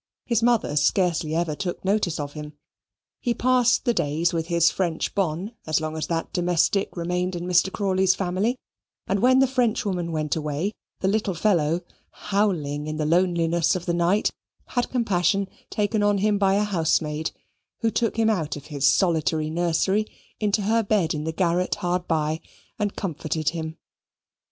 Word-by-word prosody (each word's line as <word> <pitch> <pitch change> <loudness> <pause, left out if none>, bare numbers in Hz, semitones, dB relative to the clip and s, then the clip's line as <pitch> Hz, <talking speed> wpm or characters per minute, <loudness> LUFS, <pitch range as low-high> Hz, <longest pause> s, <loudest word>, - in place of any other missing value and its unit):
His 235 -2 +1
mother 230 -10 +2
scarcely 160 0 +1
ever 165 -2 0
took 175 +4 -4
notice 190 -5 +1
of 145 -1 -4
him. 150 0 -8 0.7
He 240 -1 -1
passed 250 0 +3
the 240 - +3
days 160 0 0
with 165 -1 -1
his 170 -1 +3
French 170 -4 -2
bonne 185 +2 -1 0.2
as 155 0 +2
long 155 0 -4
as 160 - -3
that 165 -1 -3
domestic 180 +2 +1
remained 180 +2 -1
in 175 0 -4
Mr. 180 +1 +3
Crawley's 190 -2 +2
family, 190 +6 0 0.5
and 195 - 0
when 255 +4 +5
the 270 - +6
Frenchwoman 215 -9 0
went 155 -2 -1
away, 155 +5 -2 0.3
the 190 - +1
little 200 -2 0
fellow, 170 -3 +2 0.3
howling 170 -8 -1
in 155 0 -3
the 155 - -1
loneliness 170 0 +2
of 180 -1 -4
the 175 - 0
night, 175 +5 +2 0.4
had 245 -1 -1
compassion 200 -5 +1 0.2
taken 210 +1 0
on 205 0 +3
him 205 +1 +1
by 195 -1 +3
a 205 - +2
housemaid, 160 -5 0 0.5
who 225 - +2
took 230 +1 0
him 225 -1 +3
out 175 -9 0
of 145 - -9
his 140 0 +2
solitary 160 -3 +2
nursery 175 +5 +1 0.3
into 210 -1 +1
her 225 +3 +2
bed 200 -6 +1
in 150 0 -4
the 160 - -1
garret 175 +1 0
hard 180 0 -2
by 155 0 0 0.4
and 205 -2 -1
comforted 155 -3 -2
him. 160 -1 -5
180 Hz, 170 wpm, -24 LUFS, 160-205 Hz, 0.7 s, the